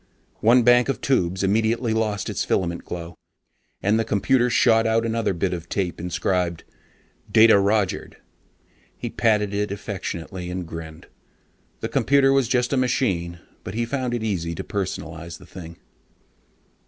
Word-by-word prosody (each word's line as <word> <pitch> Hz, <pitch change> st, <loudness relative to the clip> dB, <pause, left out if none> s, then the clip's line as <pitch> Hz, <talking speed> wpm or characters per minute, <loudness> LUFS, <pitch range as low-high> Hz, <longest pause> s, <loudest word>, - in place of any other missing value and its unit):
One 120 Hz, +3 st, +5 dB
bank 125 Hz, +2 st, +5 dB
of 135 Hz, -, -1 dB
tubes 95 Hz, -8 st, 0 dB
immediately 110 Hz, +3 st, +1 dB
lost 110 Hz, -2 st, -1 dB
its -, -, -2 dB
filament 85 Hz, -2 st, -1 dB
glow, 85 Hz, -1 st, -7 dB, 0.7 s
and 105 Hz, +3 st, +3 dB
the -, -, +2 dB
computer 120 Hz, +4 st, +2 dB
shot 115 Hz, -2 st, +4 dB
out 115 Hz, +1 st, +2 dB
another 115 Hz, -1 st, 0 dB
bit 90 Hz, +1 st, -1 dB
of 85 Hz, -1 st, -6 dB
tape 90 Hz, -4 st, -2 dB
inscribed 85 Hz, 0 st, -1 dB, 0.7 s
DATA 110 Hz, -2 st, +7 dB
ROGERED. 100 Hz, -1 st, 0 dB, 0.8 s
He -, -, -5 dB
patted 105 Hz, -3 st, +1 dB
it 105 Hz, +1 st, -1 dB
affectionately 95 Hz, -3 st, -5 dB
and 90 Hz, -1 st, -4 dB
grinned. 80 Hz, -1 st, -8 dB, 0.8 s
The -, -, -1 dB
computer 135 Hz, -1 st, +3 dB
was 135 Hz, -3 st, +2 dB
just 125 Hz, +1 st, +1 dB
a -, -, +2 dB
machine, 90 Hz, -10 st, 0 dB, 0.2 s
but 95 Hz, -, -7 dB
he 120 Hz, +1 st, 0 dB
found 125 Hz, -1 st, -2 dB
it 115 Hz, -, -3 dB
easy 85 Hz, -6 st, -2 dB
to -, -, -5 dB
personalize 85 Hz, -4 st, -5 dB
the 90 Hz, -, -15 dB
thing.... 85 Hz, -2 st, -10 dB
100 Hz, 150 wpm, -23 LUFS, 85-115 Hz, 0.8 s, DATA